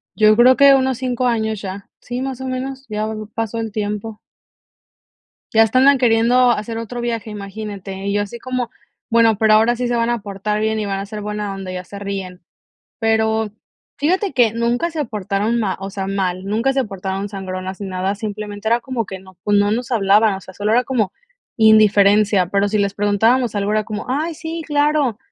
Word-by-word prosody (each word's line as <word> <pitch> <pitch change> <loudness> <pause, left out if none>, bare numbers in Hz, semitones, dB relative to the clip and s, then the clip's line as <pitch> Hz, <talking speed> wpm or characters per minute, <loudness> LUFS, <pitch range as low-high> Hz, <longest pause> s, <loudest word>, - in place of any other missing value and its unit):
Yo 215 0 +5
creo 255 +2 +7
que 280 -1 +7
unos 260 -2 +1
5 255 -1 -1
años 220 -3 -1
ya, 195 0 -7
sí, 245 +1 -5
más 265 -1 -4
o - - -4
menos, 265 +1 -4
ya 215 0 -2 0.3
pasó 225 0 -3
el 225 -1 -3
tiempo. 210 +1 -4 1.3
Ya 225 0 +7
hasta 225 +3 +2
andan 275 +1 +6
queriendo 245 +1 +4
hacer 225 0 -3
otro 230 +2 -5
viaje, 230 -2 -3
imagínate, 200 -2 -7
y 200 - 0
yo 205 - +1
así 205 +3 -6
como: 255 0 -3 0.4
"Bueno, 230 -2 +4
¿pero 220 0 +4
ahora 225 +3 +4
sí 250 0 -1
se 240 - 0
van 230 0 +1
a 240 -1 0
portar 205 +1 -3
bien 220 0 0
y 210 - -2
van 195 -1 -2
a 195 - -4
ser 210 +1 -7
buena 210 -1 -4
onda?", 195 -1 -6
y - - -5
ya 180 0 -6
se 200 +3 -9
ríen, 195 -2 -5 0.6
pero 220 -1 +1 0.5
fíjate 370 +6 0
que 240 -5 +3
nunca 235 +8 0
se 310 -2 -2
portaron 210 +1 -1
ma 195 -4 -1
o 195 0 -5
sea, 195 -1 -4
mal, 185 -2 -2
nunca 225 +6 +1
se 270 0 +1
portaron 195 -1 -4
sangronas 190 -1 -6
ni 200 - -4
nada, 190 +2 -2
simplemente 210 0 -6
era 235 +2 +3
como 245 -5 -3
que 190 -1 -7
no, 190 -1 -17
pues, 205 0 +3
no 205 0 +3
nos 245 +3 -2
hablaban, 210 0 +4
o 190 - -6
sea, 190 - -12
solo 205 +3 -1
era 245 +2 +4
como 235 -7 -1 0.4
indiferencia, 210 -3 +5
pero 200 +2 +1
si 210 +1 0
les 200 -1 0
preguntábamos 220 +4 +2
algo 200 0 -1
era 215 0 +1
como: 210 -1 -5
"Ay, 310 +6 -1
sí, 325 +1 -5
claro", 290 -5 +1
215 Hz, 205 wpm, -19 LUFS, 200-240 Hz, 1.3 s, creo